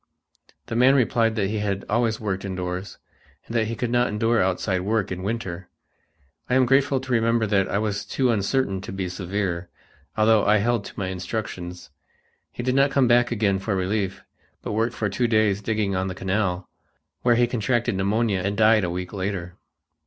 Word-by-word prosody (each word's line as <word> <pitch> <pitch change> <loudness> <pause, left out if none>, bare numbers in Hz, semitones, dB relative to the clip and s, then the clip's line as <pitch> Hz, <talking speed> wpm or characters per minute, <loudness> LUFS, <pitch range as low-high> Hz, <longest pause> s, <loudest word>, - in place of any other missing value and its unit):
The 115 - -5
man 130 +3 +5
replied 115 -3 +2
that 100 -2 0
he 110 - -1
had 100 -2 -2
always 115 0 +1
worked 95 -3 -3
indoors 90 0 -4 0.5
and 115 - -7
that 110 -1 +2
he 115 - -3
could 115 +2 -2
not 120 0 +3
endure 115 +2 +1
outside 95 0 0
work 105 0 -1
in 90 0 -4
winter. 95 -4 -4 0.8
I 125 - +2
am 130 -1 +5
grateful 135 +1 +3
to 130 0 -7
remember 115 -1 +2
that 100 -2 +1
I - - 0
was 105 -1 -1
too 130 -2 0
uncertain 100 -2 0
to - - -7
be 95 -1 -3
severe, 90 -1 -3 0.5
although 110 -1 +4
I 105 +1 +4
held 115 0 0
to - - -11
my 95 -2 -2
instructions. 90 -3 -5 0.6
He 120 - -6
did 125 +1 +1
not 135 +1 +4
come 135 -3 +2
again 115 -5 +2
for 95 +1 -2
relief, 95 +1 -2 0.4
but - - -4
worked 115 +2 0
for 105 - -1
two 120 +5 0
days 110 -3 +2
digging 105 -2 -1
on 95 +1 -1
the 95 - -5
canal, 95 -1 -1 0.5
where 120 -1 +4
he 120 +1 +4
contracted 120 0 0
pneumonia 100 +1 +1
and 100 +2 -2
died 110 -1 +5
a 90 - -1
week 90 +2 -5
later. 95 -3 -4
105 Hz, 190 wpm, -24 LUFS, 95-115 Hz, 0.8 s, man